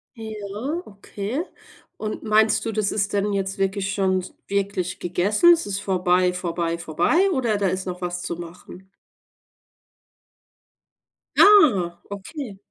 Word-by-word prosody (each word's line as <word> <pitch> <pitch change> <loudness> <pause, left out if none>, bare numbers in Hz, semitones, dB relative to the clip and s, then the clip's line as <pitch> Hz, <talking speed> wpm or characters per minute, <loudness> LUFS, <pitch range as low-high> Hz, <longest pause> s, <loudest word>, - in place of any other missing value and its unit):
Ja, 220 - -5
okay. 205 - -5 0.5
Und 215 -1 -4
meinst 215 0 +3
du, 225 - -1
das 210 -2 -1
ist 200 -1 -1
denn 205 0 0
jetzt 195 -1 -2
wirklich 195 0 -1
schon 190 -2 +1 0.2
wirklich 195 -2 -2
gegessen? 200 - +3
Es 335 - -1
ist 200 -1 -3
vorbei, 180 -2 +2
vorbei, 170 -2 -2
vorbei 175 - +1
oder 240 - 0
da 200 -1 +1
ist 185 +1 -2
noch 180 0 -4
was 175 0 -3
zu 170 - -4
machen? 175 +2 -11 2.5
Ah, 220 - +6
okay. 205 +2 -7
195 Hz, 125 wpm, -23 LUFS, 180-215 Hz, 2.5 s, Ah